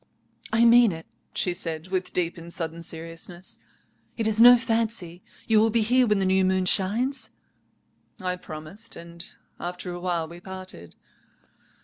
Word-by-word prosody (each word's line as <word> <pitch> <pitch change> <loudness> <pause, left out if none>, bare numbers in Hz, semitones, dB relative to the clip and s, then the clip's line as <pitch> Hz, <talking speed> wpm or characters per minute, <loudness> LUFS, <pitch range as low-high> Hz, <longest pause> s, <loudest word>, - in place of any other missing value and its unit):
"'I 230 +1 +4
mean 235 -2 +7
it,' 165 0 -9 0.3
she 180 - 0
said, 165 -1 -4
with 185 -1 -2
deep 175 -1 -1
and 170 0 -10
sudden 165 -1 -3
seriousness, 165 +2 -7 0.6
'it 225 - -1
is 220 0 +3
no 245 +1 +10
fancy. 225 -7 -1 0.3
You 220 -1 +5
will 225 +1 +4
be 225 0 +2
here 250 +3 +3
when 210 -1 +3
the 195 - +1
new 190 0 +3
moon 185 0 +2
shines?'" 230 +9 +2 0.9
"I 180 -2 -2
promised, 175 +7 -8
and 170 0 -8 0.4
after 180 +1 -5
a 175 - -6
while 175 -2 -1
we 170 +2 -11
parted. 185 - -9
185 Hz, 155 wpm, -25 LUFS, 170-220 Hz, 0.9 s, no